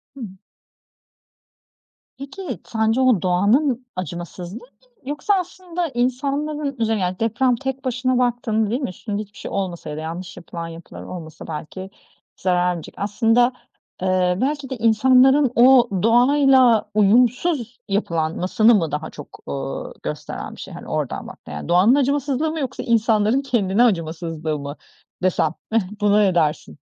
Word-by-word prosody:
Hı - - -11
hı. 230 - -4 1.9
Peki, 280 +1 -7
sence 225 +2 +1
o 250 -8 +4
doğanın 230 +9 +2
acımasızlığı 175 - -6
mı, 245 - -16 0.4
yoksa 295 +8 0
aslında 355 -1 -4
insanların, 280 +3 -2
üzerine 220 -2 0
yani 180 0 -2
deprem 240 +3 +2
tek 265 +1 -5
başına 255 0 0
baktığında, 230 -3 0
değil 245 +6 -1
mi, 260 - -2
üstünde 205 +3 -5
hiçbir 205 -1 -12
şey - - -7
olmasa 180 -5 -3
ya 150 - -5
da - - -4
yanlış 175 +3 -6
yapılan 170 -1 -7
yapılar 165 +1 -10
olmasa 160 -3 -9
belki 165 +4 -7 0.5
zararcık, 180 -2 -1
aslında, 225 +4 +2 0.5
eee, 185 -1 +1
belki 280 0 -1
de 260 - -4
insanların, 255 +4 +4
o, 245 0 +6 0.2
doğayla 250 0 +5
uyumsuz 240 - +2
yapılanmasını 185 +4 +2
mı 165 -7 0
daha 150 - -3
çok, - - -12
ııı, 70 -1 -5
gösteren - - -6
bir - - -11
şey, - - -9
hani - - -10
oradan - - -3
baktığında, - - -10
yani 75 - -7
doğanın 185 +9 +5
acımasızlığı 285 +2 0
mı 320 - -4
yoksa 270 - -4
insanların 225 0 +2
kendine 230 -5 +1
acımasızlığı 165 -6 -1
mı 140 +1 -6 0.5
desem, 170 -3 +1 0.2
heh 225 0 +3 0.2
buna 205 0 +4
ne 210 - +4
edersin? 155 - 0
225 Hz, 145 wpm, -21 LUFS, 180-260 Hz, 1.9 s, o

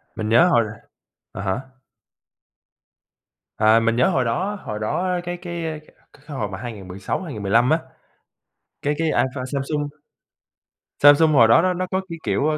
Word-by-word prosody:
Mình 110 0 -3
nhớ 160 +11 +6
hồi 120 -10 +3 0.7
à - - -6
hả? 95 +5 -1 2.0
À! 110 +1 +5
Mình 115 0 +1
nhớ 125 - +3
hồi 130 -2 +1
đó 190 - -1
hồi 105 0 -5
đó 180 +11 -1
cái 175 0 -4
cái, 170 -1 -6
ơ, 155 -1 -4
c 150 - -22 0.3
cái 145 - -22
hồi 105 -5 -2
mà 95 - -6
2016, 100 - -5
2015 115 - +1
á, 160 - +3 1.0
cái 145 - 0
cái 165 - 0
iPhone 130 -4 0
Samsung 145 +2 -2 1.1
Samsung 145 +2 +6
hồi 115 -5 +6
đó 115 +8 +6
nó 185 0 +1
nó 185 +1 -3
có 190 - 0
cái, 165 -1 -7
kiểu, 140 +10 0
140 Hz, 160 wpm, -22 LUFS, 110-165 Hz, 2.0 s, nhớ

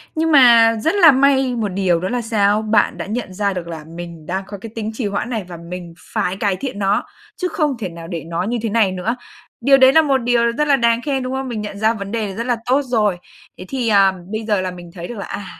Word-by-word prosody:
Nhưng 320 0 +1
mà 235 -5 +7
rất 325 +5 +1
là 335 -7 +8
may 265 -1 +3
một 220 -3 -1
điều 185 -3 +1
đó 185 - -3
là 245 0 -1
sao? 215 -2 +1
Bạn 215 -1 +1
đã - - -4
nhận 210 -2 -4
ra 200 0 -1
được 175 -2 -5
là 160 -2 -7
mình 170 -2 -9
đang 190 +4 -3
có 200 0 -7
cái 215 +3 -10
tính 220 -1 -3
trì 220 -1 -4
hoãn 200 +4 -3
này 220 -5 -2
và 175 -2 -8
mình 170 0 -8 0.2
phải 185 +2 -1
cải 200 -3 0
thiện 255 -3 -5
nó, 195 0 +1 0.3
chứ 365 - -2
không 305 - -1
thể 190 -5 -3
nào 165 0 -10
để 170 -3 -5
nó 170 +2 -3
như 235 +4 -1
thế 230 - -2
này 210 -3 +2
nữa. 190 +6 -2 0.5
Điều 275 +2 +5
đấy 260 0 +6
là 320 - +7
một 275 -3 +2
điều 235 -1 +1
rất 300 +5 -1
là 280 - +5
đáng 235 -2 +2
khen, 270 -2 -2
đúng 255 +1 -4
không? 265 0 -3
Mình 230 -4 -4
nhận 205 -1 -6
ra 220 +2 +2
vấn 200 -2 -6
đề 215 -4 -3
rất 230 - -3
là 245 - +2
tốt 265 +3 +2
rồi. 215 -7 +1 0.4
Thế 185 - -9
thì, 255 -4 -2
à, 195 -2 +5 0.2
bây 220 +1 -3
giờ 210 -3 0
là 185 -1 -3
mình 175 -1 -11
thấy 175 -2 -7
được 240 - -8
là, 200 - -5
à, 200 - -6
220 Hz, 275 wpm, -19 LUFS, 190-250 Hz, 0.5 s, là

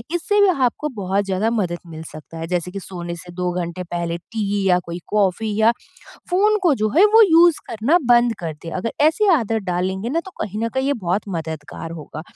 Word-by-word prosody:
इससे 345 +5 +1
भी 405 - +6
आपको 275 -3 0
बहुत 200 0 -1
ज़्यादा 195 +3 0
मदद 185 -7 -1
मिल 160 -1 -8
सकता 155 +2 -11
है, 165 0 -5
जैसे 180 0 -2
कि 200 - -5
सोने 175 -2 -6
से 175 +1 -11
2 180 0 -2
घंटे 170 +1 -5
पहले 170 -1 -3
टी 205 +2 -3
या 180 - +5
कोई 170 0 -5
कॉफ़ी 210 +1 0
या 220 +1 +5 0.6
फ़ोन 420 +4 +3
को 340 -6 +4
जो 215 - +2
है 370 - +7
वो 450 - +9
यूज़ 340 -4 +5
करना 235 +11 +2
बंद 240 -1 +5
कर 165 -2 -3
दें 165 - -6
अगर 205 +5 -3
ऐसी 320 +8 +3
आदत 225 -6 0
डालेंगे 190 +4 -1
ना 330 +4 +1
तो - - -8
कहीं 210 +1 -5
न - - 0
कहीं 265 0 0
ये 285 - +2
बहुत 180 +4 0
मददगार 160 -2 -6
होगा। 155 -1 -8
200 Hz, 215 wpm, -21 LUFS, 175-250 Hz, 0.6 s, वो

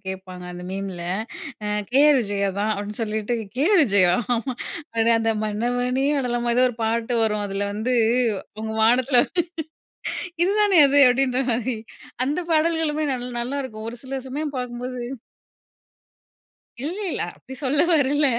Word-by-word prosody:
கேட்பாங்க 185 -1 -7
அந்த 180 0 -8
மீம்ல 190 -2 -5 0.6
அ - - -2 0.2
"கேஆர் 285 +2 +5
விஜயா" 200 -2 -1
தான் 215 +1 +1
அப்டின்னு 205 +2 -6
சொல்லிட்டு 220 +1 -2 0.2
கேஆர் 340 +6 +4
விஜயா 195 -8 +4 0.8
உடனே, 230 0 +3
"அந்த 225 0 +1
மன்னவனே 245 +5 0
அழலாமா" 240 -2 0
ஏதோ 250 - +5
ஒரு 245 - -7
பாட்டு 230 +2 0
வரும் 210 -2 +1
அதில 200 +1 -2
வந்து 220 +5 -1 0.7
உங்க 220 0 -3
வானத்தில 245 +2 +5 1.2
இதுதானே 400 -2 +4
அது 285 +1 +4
அப்டின்ற 255 +1 +2
மாரி 240 +1 -1 0.5
அந்த 290 +5 -1
பாடல்களுமே 310 -1 +1
நல் 250 0 -5
நல்லாயிருக்கும் 240 -4 -4
ஒரு 240 - -9
சில 265 0 -4
சமயம் 290 +2 -4
பார்க்கும்போது 250 0 -5 1.9
இல்ல 350 +7 -4
இல்ல. - - -2 0.2
அப்டி 265 - -11
சொல்ல 280 +2 +4
வரல 290 0 +3
245 Hz, 130 wpm, -23 LUFS, 215-275 Hz, 1.9 s, கேஆர்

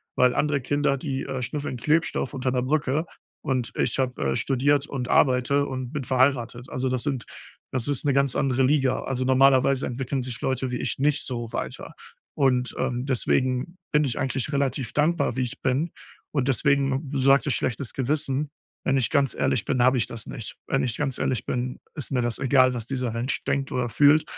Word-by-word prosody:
Weil 125 -1 +4
andere 145 -2 +1
Kinder, 145 +1 +1
die, 135 -1 -3
äh, 130 -1 -4
schnüffeln 140 +1 -3
Klebstoff 155 +1 0
unter 130 -1 -1
'ner 125 -1 0
Brücke, 150 +3 0 0.4
und 130 -5 -1
ich - - 0
habe, 125 -1 -1
äh, - - -2
studiert 140 +2 +2
und 125 -3 -4
arbeite 135 +2 +3
und 130 -2 -5
bin 145 - -3
verheiratet. 125 -2 +1
Also, 130 +1 -1
das 130 -1 -1
sind 135 -5 -2 0.5
das 130 -1 -1
ist 145 0 -1
'ne 140 - +3
ganz 140 -1 +2
andere 135 -1 +1
Liga. 135 -1 +2
Also, 130 -1 -1
normalerweise 130 0 +4
entwickeln 130 +2 -2
sich 125 -2 -4
Leute 130 0 -1
wie 125 - -2
ich - - -3
nicht 150 +1 +1
so 120 -3 -4
weiter. - - -5 0.4
Und, 130 -2 +1
ähm, 125 0 -1
deswegen 130 +5 0
bin 150 0 +3
ich 125 -4 -2
eigentlich 135 +1 -2
relativ 135 -4 -1
dankbar, 150 -4 +1
wie - - +1
ich 120 - -5
bin. 140 +6 0 0.4
Und 140 -3 0
deswegen 140 +1 +1
Du 140 - -2
sagtest: 135 0 +4
„schlechtes 125 0 -2
Gewissen.“ 140 +1 -1 0.3
Wenn 135 - +2
ich 125 - +1
ganz 140 -3 +2
ehrlich 115 - 0
bin, 125 -3 +1
habe 130 0 +4
ich 115 - 0
das 115 -2 -6
nicht. 115 - -7
Wenn 135 - +1
ich 120 -2 0
ganz 135 -3 -1
ehrlich 130 -5 -1
bin, 125 0 -3 0.2
ist 145 - -4
mir 125 -2 +1
das 120 -1 -1
egal, 130 -1 +4
was 115 -3 -3
dieser 125 -3 -2
Mensch 120 +4 -2
denkt 135 -1 0
oder 125 -1 -1
fühlt, 145 +5 +5
130 Hz, 195 wpm, -25 LUFS, 125-140 Hz, 0.5 s, fühlt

